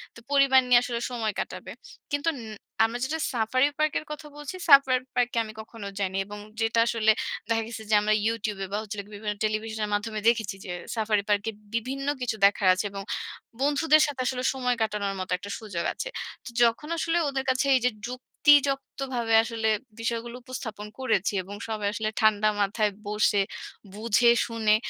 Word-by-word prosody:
তো - - -11
পরিবার 275 -2 +6
নিয়ে 245 -1 +7
আসলে 235 -1 -2
সময় 225 -3 -1
কাটাবে। - - -5 0.4
কিন্তু 290 +2 -1 0.6
আমরা 225 +2 0
যেটা 315 +4 -2
সাফারি 250 +4 +2
পার্কের 310 0 +1
কথা 300 0 -7
বলছি, 295 +3 -7
সাফারি 275 -3 +7 0.2
পার্কে 245 -1 +1
আমি 215 -1 -9
কখনো 220 -2 -9
যাইনি। 190 -1 -1
এবং 205 0 -8 0.2
যেটা 225 +1 +2
আসলে 220 -2 +3 0.4
দেখা 225 0 +2
গেছে 230 -1 -7
যে, - - +1
আমরা 215 +1 +2
ইউটিউব 215 -3 -1
বা - - +1 0.4
বিভিন্ন 210 0 -3
টেলিভিশনের 215 0 -1
মাধ্যমে 215 +1 -1
দেখেছি 220 -4 +2
যে 185 - -5 0.2
সাফারি 215 -2 +1
পার্কে 205 +1 +1 0.3
বিভিন্ন 265 +4 -3
কিছু 245 -3 -1
দেখার 200 -1 +3
আছে 185 - -2
এবং 195 0 -5 0.6
বন্ধুদের 300 +2 +4
সাথে 280 -3 -4
আসলে 250 0 -2
সময় 250 -2 0
কাটানোর 210 -2 -1
মত 185 - -4
একটা 200 +3 -9
সুযোগ 200 -7 -4
আছে। - - -5 0.4
তো - - -6
যখন 235 +6 +2
আসলে 330 +1 +1
ওদের 270 -1 -2
কাছে 260 +2 +2
এই - - +4
যে, 250 - +4 0.2
যুক্তিযক্তভাবে 270 -2 +1
আসলে 225 -1 -1 0.3
বিষয়গুলো 235 +1 -3
উপস্থাপন 220 -5 -6
করেছি 215 -7 +1
এবং 200 +3 -8
সবাই 215 -2 -2
আসলে 215 0 -1
ঠান্ডা 215 -1 +4
মাথায় 210 +1 +1 0.2
বসে 210 -1 +2 0.5
বুঝে 230 +2 +4
শুনে 220 -2 +2
230 Hz, 165 wpm, -27 LUFS, 210-255 Hz, 0.6 s, নিয়ে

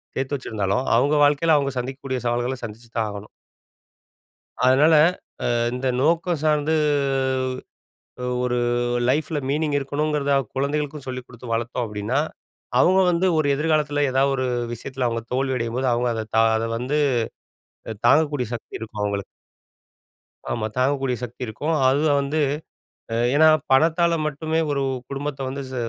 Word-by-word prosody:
சேர்த்து 135 +2 -1
வச்சிருந்தாலும், 110 0 -2
அவுங்க 145 +4 +3
வாழ்க்கைல 150 +2 +3
அவுங்க 140 -1 -1
சந்திக்க 130 +2 -5
கூடிய 130 -2 -2
சவால்கள, 120 +2 -1
சந்திச்சு 115 +2 -11
தான் 110 - +1
ஆகணும். 100 +1 -8 1.4
அதனால 140 +5 +5 0.6
அ - - +1 0.2
இந்த 130 +1 -1
நோக்கம் 165 +2 +1
சார்ந்து, 155 0 +2 1.7
ஒரு 125 -1 0 0.5
லைஃப்ல 150 +3 0
மீனிங் 150 +1 0
இருக்கணுங்கறத 145 +1 -1
அ - - +2 0.2
குழந்தைகளுக்கும் 145 +1 -2
சொல்லிக் 125 -1 -5
குடுத்து 120 -1 -8
வளர்த்தோம் 120 +1 -2
அப்படீன்னா, 105 +6 -1 0.6
அவங்க 185 +1 +5
வந்து 175 +2 +1
ஒரு 155 - +2
எதிர்காலத்தில 150 -1 +1
ஏதாவது 135 +1 +2
ஒரு 130 -1 -1 0.3
விஷயத்தில 130 +1 -3
அவங்க 115 0 -3
தோல்வியடையும்போது, 130 -1 -1
அவங்க 120 +1 0
அத 110 -1 -4
தான் 115 0 +5
அத 115 +1 -1
வந்து 135 +5 -1 0.9
அ - - -3
தாங்கக்கூடிய 145 -3 +3
சக்தி 115 - -6
இருக்கும் 110 -2 -6
அவங்களுக்கு. 100 -1 -2 1.3
ஆமா, 110 -2 -1
தாங்கக்கூடிய 135 0 +1
சக்தி 120 +2 -9
இருக்கும். 150 +9 -2
அதுவும் 145 +2 +3
வந்து 150 +3 -1 0.9
ஏன்னா, 160 +2 +6 0.2
பணத்தால 165 +5 +4
மட்டுமே 160 +2 -1
ஒரு 140 - 0 0.3
குடும்பத்த 140 0 -4
வந்து 140 +1 -4
ச - - -7
135 Hz, 135 wpm, -23 LUFS, 120-150 Hz, 1.7 s, ஏன்னா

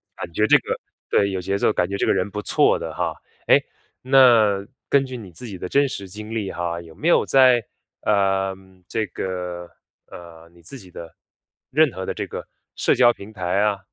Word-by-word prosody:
感 85 - -7
觉 105 +5 +2
这 - - +7
个 - - -4 0.3
对， 100 - +2
有 95 -1 -3
节 95 +2 -2
奏， 100 - +2
感 90 -4 0
觉 100 - -4
这 - - 0
个 - - +4
人 95 +1 -1
不 105 - -4
错 - - +2
的 - - -5
哈。 - - -2 0.3
哎， - - +5 0.4
那 115 -7 +5 0.2
根 140 -1 +3
据 130 -1 -7
你 100 -6 -10
自 125 - -10
己 105 -5 -7
的 90 - -5
真 140 0 +3
实 100 -6 -7
经 105 +3 -8
历 105 -4 -3
哈， 85 0 -3
有 80 -1 -14
没 160 - -3
有 - - +5
在， 130 -3 +5 0.4
呃， 95 -2 +1 0.3
这 110 +2 -2
个， 90 -1 -5 0.4
呃， 85 -1 -13
你 85 0 -21
自 130 +11 -10
己 95 - -15
的 85 -1 -10 0.6
任 155 0 +4
何 95 0 -5
的 - - -3
这 - - -4
个 - - -7 0.3
社 - - +2
交 120 -1 +6
平 100 0 -12
台 95 0 -1
啊， 105 -1 +1
100 Hz, 225 characters per minute, -22 LUFS, 90-115 Hz, 0.6 s, 这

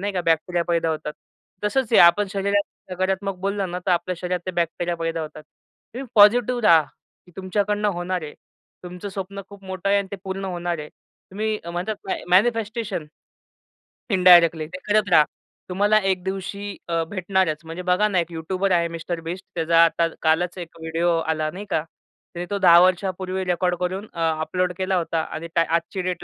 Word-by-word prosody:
नाही 200 +1 -2
का 180 - -1
बॅक्टेरिया 170 +1 +1
पैदा 170 -1 +1
होतात. 150 -1 -4 0.5
तसंच 240 +2 0
आहे, - - +6
आपण 175 +4 +6
शरीरात 200 +1 +1 0.3
नकारात्मक 190 +1 -1
बोललं 195 -1 -2
ना, 180 - -3
तर - - +2
आपल्या 180 +1 +1
शरीरात 180 -1 -2
ते - - -1
बॅक्टेरिया 170 +1 -1
पैदा 165 0 -2
होतात. 155 0 -7 0.5
तुम्ही 265 +1 -5
पॉझिटिव्ह 240 +4 +5
राहा, 165 -6 +6 0.4
की - - -18
तुमच्याकडनं 205 +2 0
होणार 175 0 -2
आहे. 150 - -8 0.5
तुमचं 180 +3 -7
स्वप्न 195 0 -6
खूप 200 -1 -14
मोठं 190 0 -4
आहे 200 0 +4
आणि 195 -1 -3
ते 200 - -5
पूर्ण 195 +1 -4
होणार 175 -2 -3
आहे. 150 - -7 0.4
तुम्ही 215 +2 -2
अ, 170 - -6
म्हणतात 180 +5 -3
ना - - +1
ए - - -10
मॅनिफेस्टेशन 215 -3 +1 1.1
...इंडायरेक्टली 175 -4 +6
ते 185 +3 -8
करत 210 -1 +2
राहा. 155 - +7 0.5
तुम्हाला 205 +3 +3
एक 185 -1 0
दिवशी 195 +1 -5
अ, 165 -1 +1
भेटणारच. 185 -4 0
म्हणजे 165 +3 -6
बघा 210 +4 +3
ना 190 -4 +1
एक 170 0 -3
यूट्यूबर 185 +4 -2
आहे 170 -1 +3
मिस्टर 170 +1 -4
बीस्ट, 185 +3 -5
त्याचा 165 0 +4
आता 165 0 +1
कालच 170 +3 +1
एक 165 -1 -9
व्हिडिओ 165 +2 0
आला, 155 -1 -1
नाही 200 +3 -8
का? 155 - 0 0.5
त्याने 175 +1 -4
तो 200 - -1
10 170 -2 +7
वर्षांपूर्वी 185 0 0
रेकॉर्ड 180 0 +1
करून 190 +4 -3
अ, 170 - -8 0.2
अपलोड 180 +3 -1
केला 190 0 0
होता 165 -1 -1
आणि 165 +2 -6
त्या 165 - +5
आजची 185 +3 -2
डेट 180 -1 -3
180 Hz, 185 wpm, -23 LUFS, 170-200 Hz, 1.1 s, राहा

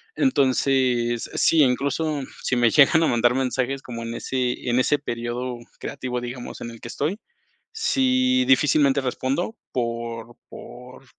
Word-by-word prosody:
Entonces, 130 - +1
sí, 160 - +4
incluso 140 +3 +1 0.2
si 130 - 0
me 120 -1 +4
llegan 150 +5 +5
a - - +3
mandar 120 +1 +3
mensajes 130 +1 -1
como 115 -2 -7
en 115 0 -5
ese 125 -1 -2
en 120 - +2
ese 145 +3 +2
periodo 120 -1 -4 0.2
creativo, 125 -3 -4
digamos, 120 0 -7
en 120 - -5
el 115 - -12
que 120 - -8
estoy, 155 - -2 0.5
sí 255 - +2
difícilmente 140 0 +3
respondo 135 - -2
por 115 -1 -4
por 125 +2 -12
130 Hz, 140 wpm, -23 LUFS, 120-145 Hz, 0.5 s, llegan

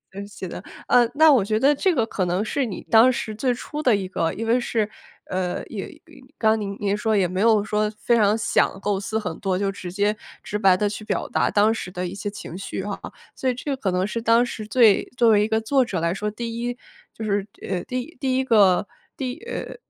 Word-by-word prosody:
嗯 200 +1 -6
写 200 -2 -8
的 180 - -8 0.2
呃， 240 -2 +5
那 315 0 +7
我 245 -7 +4
觉 215 +2 0
得 280 +5 +5
这 370 +7 +1
个 230 -5 +2
可 195 -4 -2
能 180 +4 0
是 265 +3 -1
你 205 - -6
当 230 +3 +7
时 225 -3 -4
最 250 +4 0
初 295 +5 -5
的 250 -7 +4
一 195 -2 -3
个 165 -3 -1
因 225 - -4
为 235 +2 +3
是 225 -3 -1 0.4
呃， 185 -1 -3
也 - - -5
也 - - -16 0.4
刚 220 0 +3
您 200 -1 -4
您 205 -1 0
说 215 0 +1
也 190 -2 +3
没 185 +2 -2
有 220 -2 +4
说 210 0 0
非 235 - +2
常 215 -1 +3
想 215 -3 +1
构 200 0 -1
思 205 +3 -3
很 220 - -4
多， 190 -2 -1
就 195 0 0
直 185 -2 -8
接 205 +3 +1 0.3
直 210 - -3
白 190 -3 +5
地 210 - +1
去 210 +1 -5
表 - - -2
达 - - +1
当 210 +2 +3
时 220 - -5
的 180 0 -4
一 175 - -7
些 205 +1 -4
情 200 -4 -9
绪 190 0 -5
哈。 205 0 -4 0.4
所 260 - -1
以 250 - -1
这 275 +3 -3
可 240 -7 -2
能 180 0 0
是 230 +3 -3
当 230 +1 +4
时 215 -3 -6
最 225 -3 +5
作 235 - +5
为 210 -1 +5
一 - - 0
个 220 0 +1
作 260 +4 +2
者 195 -7 -3
来 170 +1 0
说， 210 +2 -3
第 230 +2 -5
1 245 +1 -3 0.3
就 220 - -7
是， 200 -1 -1 0.2
呃， 180 -2 -2
第 255 +6 -5
第 260 -3 0
1 265 - +1
个 205 -7 +4 0.3
第 260 +2 -4
呃， 475 - -5
215 Hz, 255 characters per minute, -23 LUFS, 195-235 Hz, 0.4 s, 那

